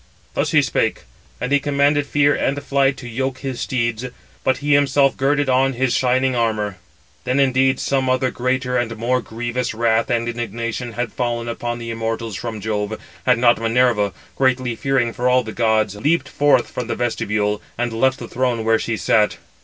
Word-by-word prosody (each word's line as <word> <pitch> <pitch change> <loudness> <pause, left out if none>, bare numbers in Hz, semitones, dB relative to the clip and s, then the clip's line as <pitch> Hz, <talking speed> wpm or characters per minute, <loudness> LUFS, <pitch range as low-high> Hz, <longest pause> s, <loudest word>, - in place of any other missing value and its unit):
Thus - - 0
he - - +4
spake, - - 0 0.4
and 125 - -3
he 145 - +4
commanded 145 0 +1
Fear 145 0 +3
and 140 +1 -1
Flight 135 -1 +2
to 125 - -8
yoke 130 +3 -2
his 135 -3 -4
steeds, 120 -2 -1 0.4
but 130 - +2
he 145 +1 +1
himself 140 -1 +3
girded 145 +1 +1
on 135 +1 +3
his 130 0 0
shining 130 0 +2
armour. 110 -4 -1 0.5
Then 130 +2 0
indeed 130 -1 +3
some 135 -1 0
other 130 0 +1
greater 125 0 -1
and 115 -2 -3
more 125 +3 0
grievous 120 +1 -3
wrath 115 0 +1
and 115 -1 0
indignation 115 +1 -4
had 120 0 -3
fallen 120 -2 -2
upon 120 0 -3
the 115 -1 -6
immortals 115 -1 -3
from 110 0 -5
Jove, 110 0 -2 0.3
had 125 -1 +5
not 120 -1 +3
Minerva, 115 -3 +2 0.2
greatly 130 -2 +1
fearing 130 -2 0
for 125 +1 0
all 125 0 +3
the 110 - -6
gods, 110 -3 +1
leaped 145 +5 +1
forth 145 -4 +3
from 125 - -4
the - - -2
vestibule, 105 -3 -1 0.2
and 120 -1 -1
left 130 +4 +2
the 120 - -8
throne 120 -3 -1
where 115 0 +3
she 115 -1 -2
sat. 105 0 +2
120 Hz, 185 wpm, -20 LUFS, 115-130 Hz, 0.5 s, had